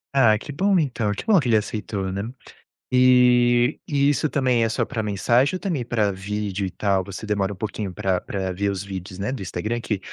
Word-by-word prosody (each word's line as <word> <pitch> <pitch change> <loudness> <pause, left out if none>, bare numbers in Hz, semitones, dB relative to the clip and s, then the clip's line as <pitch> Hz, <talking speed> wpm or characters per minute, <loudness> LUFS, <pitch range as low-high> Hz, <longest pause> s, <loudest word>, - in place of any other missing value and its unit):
Ah, 110 -6 +5
que 145 - -8
bom 190 +6 +2
então, 120 -9 0
que 105 - -5
bom 210 -4 +5
que 135 - -2
ele 110 - +5
aceitou, 105 -2 -3
né. 100 +1 -3 0.7
E 125 0 +4
e 140 -1 +2
isso 150 +2 +1
também 130 -5 +2
é 115 - +1
só - - 0
pra 110 - -3
mensagem 120 - +2
ou - - -15
também 165 -11 -2
pra 110 -3 0
vídeo 100 0 -3
e 95 - -4
tal? 100 -2 0
Você 100 +3 -8
demora 100 -2 0
um - - -6
pouquinho 100 -1 -4
pra 95 -2 -1
pra 95 -2 -3
ver 100 +2 -1
os 95 -1 -4
vídeos, 95 -1 -7
né, 100 - -2
do 120 - -6
Instagram, 105 +6 -3
que 105 -4 -2
110 Hz, 220 wpm, -23 LUFS, 100-125 Hz, 0.7 s, Ah